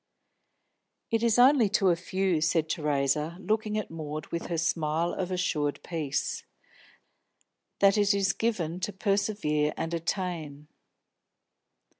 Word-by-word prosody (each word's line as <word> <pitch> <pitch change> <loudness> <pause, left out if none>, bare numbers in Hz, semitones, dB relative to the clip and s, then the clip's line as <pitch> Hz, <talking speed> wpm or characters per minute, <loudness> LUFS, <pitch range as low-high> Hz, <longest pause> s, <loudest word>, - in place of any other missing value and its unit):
"It 225 -1 +2
is 230 -1 +3
only 250 -3 +6
to 185 -4 +3
few," 180 -1 -1
said 160 0 +2
Theresa, 150 +1 0
looking 215 +2 -1
at 215 - -4
Maud 155 -1 -5
with 170 - -3
her 170 - -2
smile 160 +1 0
of 185 -2 -3
assured 150 -5 -1
peace, 155 -5 -2 1.4
"that 200 +1 +5
it 205 -1 +4
is 195 -1 +2
given 180 -7 -1
to 190 +3 -3
persevere 195 -7 0
and 165 +1 -3
attain." 165 -4 -3
175 Hz, 120 wpm, -28 LUFS, 155-200 Hz, 1.4 s, only